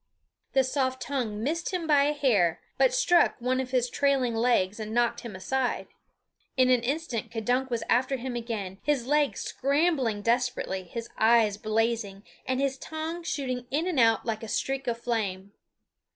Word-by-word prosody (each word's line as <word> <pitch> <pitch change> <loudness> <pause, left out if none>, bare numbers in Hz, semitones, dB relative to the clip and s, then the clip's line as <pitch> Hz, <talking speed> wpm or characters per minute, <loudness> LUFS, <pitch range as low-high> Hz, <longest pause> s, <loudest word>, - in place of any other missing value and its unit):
The 265 - +4
soft 260 0 -1
tongue 230 -7 -3
missed 330 +7 -1
him 360 -3 -2
by 290 -3 +4
a 295 - +1
hair, 210 - +2 0.2
but - - +5
struck - - +3
one 255 +2 0
of 260 -1 -3
his 250 -1 +1
trailing 270 -2 +1
legs 225 -4 +1
and 215 +1 -5
knocked 240 -1 +2
him 235 -5 -8
aside. 250 +7 -2 0.7
In 255 0 +5
an 250 -2 +4
instant 245 -4 -2
K'dunk 245 +4 -1
was 235 -2 -2
after 260 +3 +2
him 250 0 -5
again, 215 -5 -4
his 285 -5 0
legs 295 +1 +1
scrambling 275 -7 0
desperately, 235 -5 0
his 230 +6 -6
eyes 220 -2 +4
blazing, 215 -2 -1 0.2
and 260 0 0
his 270 -1 -1
tongue 315 +2 -5
shooting 255 -6 -3
in 305 +5 0
and 355 -7 0
out 225 -1 +4
like 225 -2 -2
a 225 - -6
streak 270 +4 -2
of 235 -1 0
flame. 200 -5 -3
250 Hz, 170 wpm, -27 LUFS, 225-275 Hz, 0.7 s, but